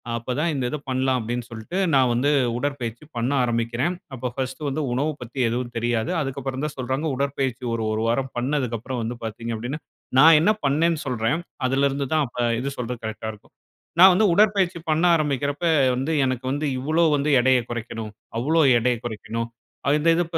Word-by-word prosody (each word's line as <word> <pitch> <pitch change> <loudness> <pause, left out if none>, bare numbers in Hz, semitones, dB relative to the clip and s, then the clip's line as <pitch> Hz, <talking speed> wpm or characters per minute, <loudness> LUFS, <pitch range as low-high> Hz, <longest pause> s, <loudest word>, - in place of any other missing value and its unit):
அப்ப 115 +2 -3
தான் 170 +1 +1
இந்த 130 -3 -1
இத 150 - -3
பண்ணலாம் 130 0 +1
அப்படின்னு 120 +1 -3
சொல்ட்டு, 115 - -6 0.2
நான் 130 -2 +4
வந்து 130 +5 +2 0.3
உடற்பயிற்சி 125 -2 -3
பண்ண 120 +4 0
ஆரம்பிக்கிறேன். 120 +8 0 0.2
அப்போ 125 0 -3
ஃபர்ஸ்ட் 130 +1 -4
வந்து 150 +3 -2
உணவு 145 +5 0
பத்தி 125 +3 -7
எதுவும் 120 +1 -3
தெரியாது. 115 -1 0
அதுக்கப்புறம் 135 0 -4
தான் 150 - -5
சொல்றாங்க. 130 +4 -2
உடற்பயிற்சி 135 -2 -2
ஒரு 115 -1 -1
ஒரு 110 - -1
வாரம் 130 +3 0
பண்ணதுக்கப்பறம் 125 -2 -1
அப்புறம் 125 +1 -4
வந்து 120 +1 -4
பாத்தீங்க 115 +1 -4
அப்படின்னா, 125 +7 -4 0.4
நான் 160 +2 +8
என்ன 180 - +4
பண்னேன்னு 155 +3 +2
சொல்றேன். 125 +5 0 0.3
அதிலருந்து 140 +1 +1
தான் 155 -2 +3
அப்ப 120 - -10 0.2
இது 135 - -2
சொல்றக்கு 125 -1 -5
கரெக்ட்டா 110 0 -4
இருக்கும். 105 - -19 0.5
நான் 190 +1 +10
வந்து 205 +4 +3
உடற்பயிற்சி 195 -3 +3
பண்ண 160 +3 +2
ஆரம்பிக்கிறப்ப 145 +1 -1 0.3
வந்து 135 +5 -2
எனக்கு 130 0 -2
வந்து 145 +2 -1
இவ்வளளோ 155 +6 +1
வந்து 145 +1 0
எடையை 130 0 +4
குறைக்கணும். 115 -2 -5 0.3
அவ்வளோ 155 +7 +1 0.2
எடையை 120 +1 +1
குறைக்கணும். 115 +1 -4 0.5
இந்த 155 +2 +2
இது 175 - +2
130 Hz, 175 wpm, -23 LUFS, 120-150 Hz, 0.5 s, நான்